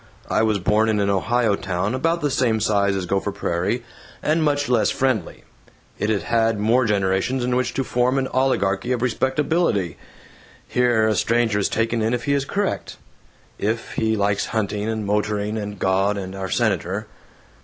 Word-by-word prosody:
I - - +3
was 110 -2 +2
born 105 +4 +2
in 105 -1 +1
an 100 0 +1
Ohio 110 +2 +1
town 95 +3 -2
about 165 +6 0
the 145 - 0
same 120 -4 +1
size 100 -2 +2
as 95 -2 -2
Gopher 100 +3 -1
Prairie, 100 +4 -2 0.4
and 155 +2 +2
much 145 -1 +1
less 120 -3 +2
friendly. 130 -9 -1 0.6
It'd 105 0 0
had 115 -1 +1
more 115 +4 +3
generations 100 +4 0
in 125 0 0
which 125 0 -1
to 135 - 0
form 125 +1 +1
an 135 -1 0
oligarchy 125 -4 +1
of 125 -1 -2
respectability. 130 - 0 0.7
Here, 120 -3 +2
a 110 - +2
stranger 115 +1 +1
is 100 - +1
taken 115 0 0
in 110 +3 +1
if 120 - -5
he 140 - +1
is 140 -1 0
correct, 200 +6 -2 0.6
if 110 +3 -2
he 110 0 0
likes 100 0 0
hunting 105 -1 -2
and 110 -2 -2
motoring 105 +1 -1
and 105 -1 -4
God 95 +2 +1
and 95 -1 -5
our 95 -1 -5
Senator. 100 -2 0
110 Hz, 175 wpm, -22 LUFS, 100-125 Hz, 0.7 s, I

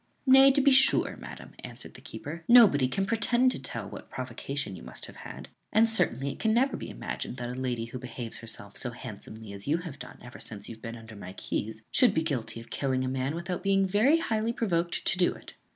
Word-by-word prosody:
"Nay, 270 0 +8
to 280 - +4
be 280 +1 +5
sure, 265 0 +5
madam," - - -10
answered - - -8
the - - -12
keeper, 165 +3 -7
"nobody 210 - +7
can 195 +10 -1
pretend 240 +4 +3
to - - -4
tell 115 -5 -4
what - - -10
provocation 130 -2 -4
you 85 - -10
must - - -6
have - - -12
had; - - -9 0.2
and 225 +2 +5
certainly 140 - +1
it - - -10
can 220 0 +2
never 265 +3 +3
be - - -6
imagined 125 - -5
that 120 -1 -4
a - - -5
lady 125 -3 -2
who 120 +2 -7
behaves 120 -2 -6
herself 100 -3 -8
so 125 - -2
handsomely 110 -3 -8
as 100 +3 -9
you 155 +3 +3
have 165 -5 -8
done - - -9
ever 120 0 -11
since 105 -2 -7
you - - -6
have 110 - -15
been 115 0 -6
under 110 -1 -11
my 95 -2 -8
keys 110 +2 -4
should 250 - +4
be 160 - +2
guilty 125 -7 -2
of 115 - -13
killing 130 -2 0
a - - -1
man 130 +3 -1
without 175 +1 -3
being 195 -1 +3
very 215 - +4
highly 225 -8 0
provoked 175 -7 -1
to 180 - +1
do 180 - +3
it." - - -13
140 Hz, 230 wpm, -29 LUFS, -, 0.2 s, Nay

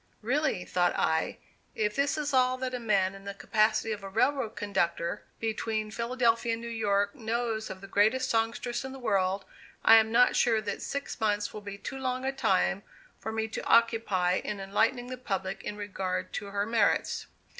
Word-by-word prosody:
Really, 265 -5 0
thought 175 -1 +1
I, 160 0 0 0.4
if 210 -1 0
this 280 +2 +1
is 295 -2 -2
all 255 0 +3
that 255 0 -3
a 250 - -2
man 200 -5 +2
in 195 0 -12
the 200 0 -5
capacity 215 +1 +1
of 210 -1 -3
a 195 - -6
railroad 230 +2 +1
conductor 180 -2 -1
between 220 -1 -2
Philadelphia 235 0 +1
and 225 - -4
New 235 - -5
York 205 -3 +1
knows 225 -1 -2
of 190 - -8
the 195 - -9
greatest 220 +7 +2
songstress 230 +2 -1
in 265 0 -6
the - - -8
world, 195 -5 0 0.4
I 225 - +9
am 220 0 +3
not 245 +2 +5
sure 225 -2 +3
that 205 -2 -4
six 280 -2 -4
months 210 -2 0
will 215 - -7
be 200 -1 -7
too 270 +6 -6
long 255 0 -2
a 270 - +1
time 195 -6 +1 0.4
for 220 - -4
me 220 0 -1
to - - -5
occupy 220 -6 +3
in 210 -1 -4
enlightening 220 +6 +1
the 255 - -5
public 195 -5 -3
in 210 - -5
regard 190 -3 -3
to 205 - -4
her 200 0 -1
merits. 225 -2 +1
220 Hz, 190 wpm, -29 LUFS, 200-240 Hz, 0.4 s, I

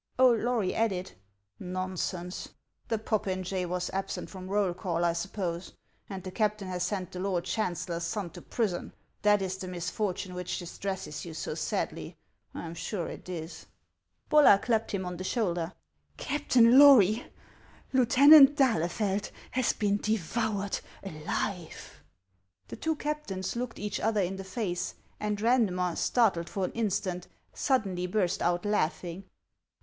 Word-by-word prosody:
Old 250 -3 +5
Lory 230 -5 0
added: 190 -5 -1 0.3
" 100 0 -26
Xonsense! 185 0 -4 0.4
The 225 - 0
popinjay 190 -4 -1
was 180 +1 -2
ab 195 0 -2
sent - - -5
from 185 -1 -8
roll 195 -2 +1
call, 175 -1 -1
I 170 - +3
snppose, 170 0 -4 0.4
and 190 -2 -6
the 185 - -6
captain 210 -1 0
has 180 -1 -3
sent 185 -1 -2
the 180 - -6
lord 185 -2 -1
chancellor's 175 -3 -2
son 190 -1 -3
to - - -10
prison: 205 -7 -2 0.3
that 205 -1 +4
is 190 0 -3
the 190 - -6
misfortune 180 +1 -3
which 180 -1 -3
distresses 185 -2 -5
you 165 -2 -8
so 155 - -4
sadly; 155 0 -3 0.3
I - - -7
am 165 - -6
sure 170 +2 -3
it - - -9
is." 165 -2 -7 0.6
Bollar 300 -9 +7
clapped 225 -2 +1
him 190 -2 -2
on 180 -1 -5
the 185 - -5
shoulder. 175 -6 -1 0.3
" - - -46
Captain 260 -4 +4
Lory, 240 -6 +7 0.7
Lieutenant 275 +3 +8
d'Ahlefeld 205 - +1 0.2
has 255 0 +2
been 205 -1 0
de 215 +2 0
voured 205 +1 -2 0.2
alive." 170 +1 -5 0.7
The - - -6
two 320 0 -1
captains 295 -13 -3
looked 240 -1 -4
each 210 0 -3
other 215 -1 +1
in 190 +1 -2
the 195 - -6
face; 190 -3 -3 0.2
and 210 -1 -1
Randmer, 200 -7 +2
startled 195 -9 +2
for 195 -2 -1
an - - -4
instant, 200 -5 -2 0.3
suddenly 195 -9 0
burst 185 -2 0
out 175 +2 +1
laughing. 180 -2 -1
190 Hz, 150 wpm, -29 LUFS, 180-220 Hz, 0.7 s, Lieutenant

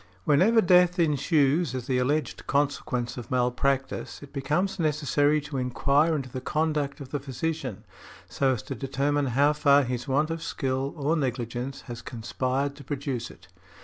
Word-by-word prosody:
Whenever 190 - +4
death 180 -1 +5
ensues 150 -2 +2
as 125 -2 -4
the 130 -1 +1
alleged 140 +1 -1
consequence 140 -4 -1
of 120 -2 -7
malpractice 130 +3 -1
it 145 - -13
becomes 155 +8 -1
necessary 150 -1 +2
to 145 -1 -6
inquire 140 +5 +2
into 135 -3 -3
the 130 +1 -6
conduct 150 -1 -1
of 135 -2 -8
the 145 - -2
physician, 135 -5 -4 0.4
so 135 -1 +1
as 110 -4 -5
to - - -5
determine 140 +1 0
how 140 +4 +3
far 145 -1 +4
his 125 +1 -3
want 150 +4 +1
of 165 0 -3
skill, 135 -2 -2
or 150 +3 +1
negligence, 125 -2 -3
has 120 -3 -8
conspired 130 +4 -2
to 145 - -11
produce 135 -5 -3
it. - - -16
140 Hz, 160 wpm, -27 LUFS, 130-150 Hz, 0.4 s, death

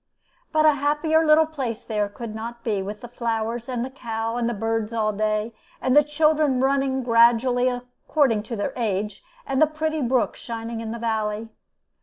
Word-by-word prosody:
But 310 0 +3
a 305 - +8
happier 300 +3 +2
little 310 0 +6
place 255 -7 -4
there 210 -3 -1
could 215 +2 -7
not 230 +2 -7
be, 210 -4 0
with 205 +2 -6
the 240 - -7
flowers, 230 0 -3
and 245 -1 -2
the 260 - -8
cow, 225 -3 -3
and 240 -1 0
the - - -1
birds 225 +1 -2
all 215 -2 0
day, 215 +2 -1 0.3
and 260 +1 +1
the 295 - +8
children 300 -2 +2
running 265 0 +1
gradually 240 +1 +4
according 250 0 0
to 235 - -2
their 205 - -2
age, 210 -3 -2 0.2
and 270 +1 0
the 310 - +7
pretty 310 0 -2
brook 250 -1 +1
shining 230 0 -5
in 225 - -5
the 235 - -4
valley. 220 -1 -2
235 Hz, 185 wpm, -24 LUFS, 225-270 Hz, 0.3 s, a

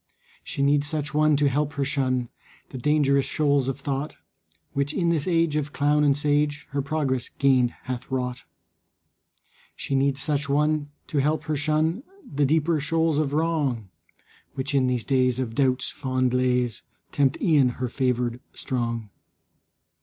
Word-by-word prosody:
She 140 - -2
needs 145 +1 +3
such 150 -1 -3
one 155 0 +4
to 145 0 +3
help 145 +2 0
her 140 -1 -1
shun 130 -4 0 0.4
The 130 - -7
dangerous 140 0 +2
shoals 145 -3 +1
of 135 0 -3
thought, 140 +2 -3 0.6
Which 140 +2 -1
in 170 -3 +1
this 165 -2 0
age 165 -3 +2
of 150 -1 -2
clown 150 +1 +2
and 140 -1 +3
sage 145 0 0
Her 140 0 -1
progress 135 -4 -1
gained 130 -3 +3
hath 125 -2 -5
wrought. 125 -1 -3 1.3
She - - -4
needs 135 0 +1
such 145 0 -1
one 150 +1 +1 0.2
to 145 - -1
help 150 +3 +1
her 155 -1 -2
shun 155 - +1 0.2
The 145 -1 0
deeper 160 +2 +2
shoals 160 +1 +1
of 145 -2 -1
wrong, 145 - 0 0.7
Which 140 +2 -3
in 135 -2 +3
these 125 -2 0
days 130 -1 +2
of 125 -3 -3
doubt's 130 0 +1
fond 130 -1 -1
lays 125 -3 +1 0.3
Tempt 135 -2 +1
e'en 145 -6 +4
her 125 - -2
favored 125 -1 -1
strong. 115 -5 -3
140 Hz, 155 wpm, -25 LUFS, 130-150 Hz, 1.3 s, one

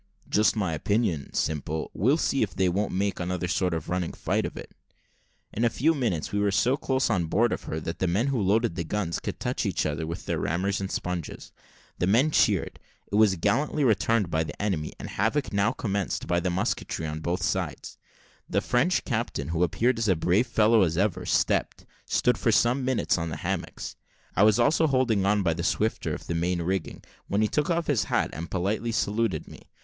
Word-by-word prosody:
"Just 105 +1 +3
my 95 -6 -1
opinion, 90 - 0
Simple; 80 +1 -2
we'll 130 - +2
see 135 -4 0
if 105 - -1
they 95 - +2
won't 100 +4 0
make 100 +1 -1
another 90 0 -2
sort 90 +1 0
of 80 - -5
running 90 -1 -2
fight - - -1
of - - -10
it." - - -9 0.8
In 115 - -1
a 120 - +4
few 155 +8 +2
minutes 115 - -1
we 105 - 0
were 100 0 +2
so 120 +6 +2
close 130 -2 0
on 90 -6 +1
board 115 +8 +2
of - - -5
her 80 - -3
that 85 - -5
the 95 - +1
men 100 +8 +1
who 135 -5 0
loaded 105 +2 +2
the 85 0 -3
guns 85 0 -2
could - - -5
touch - - -2
each - - -1
other 80 +1 -2
with 85 - -6
their - - -1
rammers 95 +4 -1
and 95 - -3
sponges. 90 -3 -4 0.5
The 90 - +1
men 125 +10 +4
cheered; - - +2 0.3
it - - -12
was 105 -2 +5
gallantly 130 - +1
returned 110 -5 +2
by 80 0 +1
the 75 -2 -8
enemy, 95 -7 -1
and - - -6
havoc 115 +8 0
was - - -11
now 100 +3 +2
commenced 100 -6 -2
by 85 - +1
the 90 +1 -1
musketry 90 -3 -2
on 75 0 -4
both 85 +2 -2
sides. 80 - -3 0.5
The - - +2
French 140 +10 +1
captain, 110 - -2
who 85 +1 -1
appeared 115 +8 +2
as 110 -2 +1
brave 90 +9 +2
a - - -22
fellow 110 0 +4
as 85 -3 +1
ever 100 -1 0
stepped, - - +1 0.2
stood 125 - +2
for 115 - +2
some 120 +4 +3
minutes 125 -7 +1
on 85 0 -2
the 75 - -5
hammocks: - - -4 0.4
I - - +2
was 105 -1 +6
also 160 +2 +3
holding 125 -8 +2
on 105 0 +2
by 85 -3 +2
the 85 - -4
swifter 105 +6 0
of - - -10
the - - -3
main 85 +1 0
rigging, 95 -1 -3 0.2
when 105 +2 +1
he - - +3
took 150 +8 0
off 170 -1 +1
his 130 -9 +1
hat - - 0
and 85 +2 -6
politely 100 +5 -1
saluted 110 -6 -1
me. - - -14
100 Hz, 215 wpm, -26 LUFS, 85-115 Hz, 0.8 s, was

